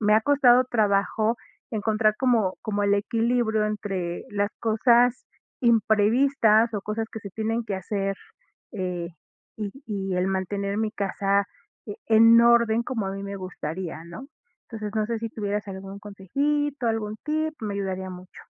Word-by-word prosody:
me 210 0 +4
ha 220 - +5
costado 255 -3 +5
trabajo 215 +1 +1 0.3
encontrar 215 -1 +1
como 230 -8 +2
como 205 -1 -1
el 200 - +2
equilibrio 225 +1 +1
entre 195 -5 -3
las 205 0 0
cosas 235 +2 +3 0.4
imprevistas 225 0 +3
o 200 - -2
cosas 220 +1 -3
que 220 - -6
se 200 - -8
tienen 225 +3 -2
que 200 -3 -3
hacer, 195 +1 -2 0.6
eh, 180 -4 -3 0.5
y 210 -2 -4 0.2
y 195 -3 -3
el 180 +1 +1
mantener 200 +1 -2
mi 220 -1 0
casa 200 -1 0 0.4
e 205 - -6
en 230 +1 +7
orden 235 -1 +4
como 225 -5 -3
a 190 - -3
mí 195 0 -6
me 200 0 -5
gustaría, 175 -2 -6
¿no? 170 +11 -9 0.4
Entonces, 215 -2 -6
no 215 -1 +1
sé, 230 -1 -2
si 230 - -4
tuvieras 205 -1 -3
algún 195 +1 -7
consejito, 275 +8 -2
algún 215 -1 -2
tip, 310 +1 -1
me 205 -2 -3
ayudaría 190 -1 -3
mucho. 180 0 -12
210 Hz, 155 wpm, -25 LUFS, 195-230 Hz, 0.6 s, en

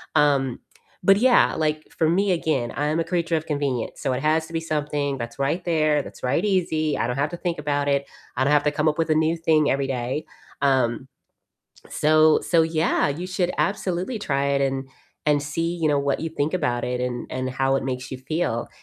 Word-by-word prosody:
um, 135 -4 +2 0.4
but 195 +2 +6
yeah, 245 +3 +4
like, 155 -1 -1
for 160 -1 +3
me, 190 +2 +2
again, 145 -8 -1
I 145 +1 -1
am 155 +2 0
a 165 - 0
creature 170 -1 0
of 155 - -5
convenience, 140 -5 -2
so 135 - 0
it 125 +1 -2
has 160 +1 +1
to 165 - -13
be 165 - 0
something 150 -3 -2
that's 120 +2 -7
right 150 +6 0
there, 155 -3 +2
that's - - -12
right 140 +9 +1
easy, 165 -6 +1
I 115 - 0
don't 125 - -2
have 140 +2 0
to 175 - -5
think 175 -1 -2
about 145 -1 -1
it, 140 0 +1 0.3
I - - +1
don't 140 - +2
have 150 -1 +4
to 150 - +3
come 155 +1 +1
up 150 - -3
with 165 -1 0
a 155 - +3
new 160 +1 +2
thing 155 -2 +2
every 135 0 0
day, 130 +3 -3 0.4
um, 130 -2 +1 0.8
so 155 +1 +4
so 165 -2 +3
yeah, 160 0 +1
you 165 +6 -4
should 185 -1 -1
absolutely 195 +3 -1
try 140 -7 -1
it 140 0 +1
and 135 -1 -1 0.4
and 145 -1 +3
see, 165 +4 -2
you 160 - +2
know, 145 -1 +2
what 140 0 0
you 165 - -3
think 155 +2 -1
about 125 -8 0
it 125 0 -2
and 125 -1 -3
and 130 0 -3
how 135 +1 +1
it 135 - -3
makes 125 -1 -4
you 130 - -5
feel, 130 -4 -2
150 Hz, 225 wpm, -23 LUFS, 135-165 Hz, 0.8 s, but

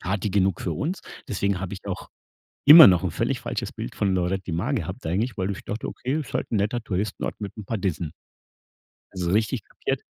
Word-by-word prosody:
Party 95 +3 -1
genug 95 -1 +1
für - - -2
uns. 175 +6 -3 0.3
Deswegen 100 -2 0
habe 95 -1 -5
ich 95 - -11
auch - - -5 0.6
immer 160 +3 +12
noch 90 -1 +3
'n 90 - 0
völlig - - -1
falsches - - -3
Bild - - -6
von 100 -2 +1
Lloret 95 +1 -1
de 85 - -4
Mar 85 - -1
gehabt - - -4
eigentlich, 105 +9 -1
weil 95 0 -1
ich 100 - -8
dachte, 110 +2 -4
okay, 135 +5 -2
ist 150 - -6
halt - - -2
'n 115 - +1
netter 105 +4 0
Touristenort 100 -1 -3
mit 100 -2 -6
'n 105 - -7
paar 115 +3 -3
Dissen. 85 -4 -2 1.0
Also 90 -2 -3
richtig 110 +2 +1
kapiert - - -3
100 Hz, 215 wpm, -25 LUFS, 95-110 Hz, 1.0 s, immer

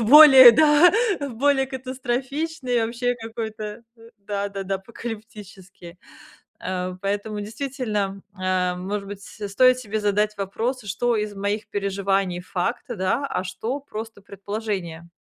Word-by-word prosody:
более, 265 0 +10
да, 305 +6 +6 0.4
более 270 +3 +2
катастрофичный, 260 0 -2
вообще 245 +2 -1
какой-то, 220 -2 -6 0.4
да-да-да, 200 -1 -4
апокалиптический. 200 -5 -10 0.6
Э, 185 0 -3
поэтому, 205 +1 -2
действительно, 215 -4 -3 0.2
э, 185 -1 0
может 200 +2 -4
быть, 200 0 -8
с-стоит 220 +6 +2
себе 215 -3 -3
задать 210 +1 +1
вопрос: 225 +6 -3
"Что 230 +5 0
из 210 -1 -3
моих 205 +2 -3
переживаний- 195 -2 -1
факт, 185 +6 -3
да, 230 +9 -1
а 185 - -2
что- 225 +9 -4
просто 225 -5 -8
предположение?" 195 -4 -5
210 Hz, 110 wpm, -23 LUFS, 195-245 Hz, 0.6 s, более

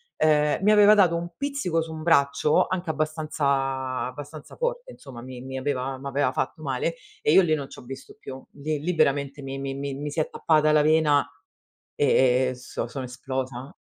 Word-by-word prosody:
ehm, 150 +2 +2
mi 210 - +5
aveva 210 0 +7
dato 180 -5 +4
un 170 +1 -5
pizzico 275 - -1
su 160 0 -6
un 160 0 -7
braccio 150 -2 +3
anche 185 -2 -3
abbastanza 140 -4 -1
abbastanza 145 +4 -9
forte - - -3
insomma, 130 -4 -11
mi 125 0 -9
mi 130 +1 -6
aveva 130 -1 -2
m'aveva 140 0 -1
fatto 155 - -3
male 140 +3 -2 0.3
e 150 - +2
io 190 - +8
lì 165 -4 +1
non 145 -3 -2
c'ho - - -12
visto 135 +2 -10
più. 130 0 -9
Lì 150 +1 -3
lì 175 +4 -2
veramente 140 -2 +1
mi 135 0 -6
mi 135 0 -4
mi 140 0 -4
mi 145 +2 -4
si 160 - 0
è - - -3
tappata 155 -1 +2
la 150 0 +5
vena 150 -2 +3 0.7
e 130 -2 +3
e - - -7
so 125 -1 -5
sono 130 +3 -6
esplosa 130 +1 -5
145 Hz, 190 wpm, -25 LUFS, 135-160 Hz, 0.7 s, io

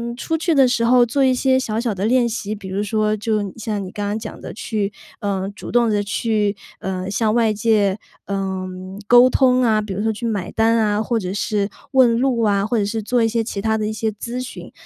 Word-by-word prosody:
出 320 +6 -2
去 330 +1 0
的 270 -3 +5
时 235 -2 +1
候 245 +1 +5
做 270 +4 +1
一 260 - +4
些 260 +1 +2
小 220 -3 -2
小 235 -3 -1
的 190 +2 -2
练 240 +1 +3
习， 215 -2 -4
比 200 -2 -9
如 195 +2 -2
说 215 +1 0
就 210 -2 -1
像 215 -3 -3
你 185 - -7
刚 205 +1 -4
刚 205 +1 -1
讲 215 -1 -8
的 - - -8
去， 210 -2 -3 0.3
呃， 195 -1 -2
主 - - -8
动 240 -1 +3
地 205 -1 +1
去， 210 0 0 0.3
呃， 185 0 -3
向 215 +1 +1
外 230 -2 +3
界， 210 -2 +2 0.3
呃， 190 -1 -3 0.4
沟 245 +2 +7
通 255 -1 +3
啊， 220 -3 +3
比 210 -1 -6
如 200 +2 -3
说 220 - +1
去 230 +2 -4
买 200 -5 -3
单 225 +1 +2
啊， 210 -1 +1
或 230 +1 0
者 185 -2 -4
是 205 0 -1 0.2
问 245 -4 +4
路 255 -2 +1
啊， 200 -3 +2
或 230 +2 0
者 205 - +1
是 220 +2 -2
做 235 +2 +1
一 - - +3
些 225 0 0
其 215 -2 -5
他 220 0 +1
的 215 -1 -2
一 - - -2
些 220 0 -1
咨 235 +4 -6
询。 255 - -8
220 Hz, 255 characters per minute, -20 LUFS, 205-235 Hz, 0.4 s, 沟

